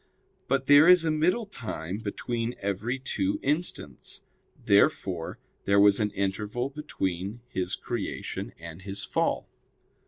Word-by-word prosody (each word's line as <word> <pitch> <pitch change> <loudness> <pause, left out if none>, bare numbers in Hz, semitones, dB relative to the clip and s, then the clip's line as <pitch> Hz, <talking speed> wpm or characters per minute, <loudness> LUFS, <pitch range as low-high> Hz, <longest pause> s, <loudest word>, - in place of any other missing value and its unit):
But 135 0 +1
there 145 +3 +8
is 180 -2 +7
a 160 - +2
middle 180 +9 +2
time 105 - -5
between 115 +2 -3
every 100 +6 -2
two 100 -7 -1
instants. 145 - -2 0.4
Therefore 90 -4 +2 0.3
there 100 0 +4
was 100 +1 +6
an 105 -1 +1
interval 105 +6 -2
between 100 - -3
his 95 -7 -2
creation 120 -4 -4
and 85 +1 -9
his 100 +1 -4
fall. - - 0
105 Hz, 125 wpm, -28 LUFS, 95-135 Hz, 0.4 s, there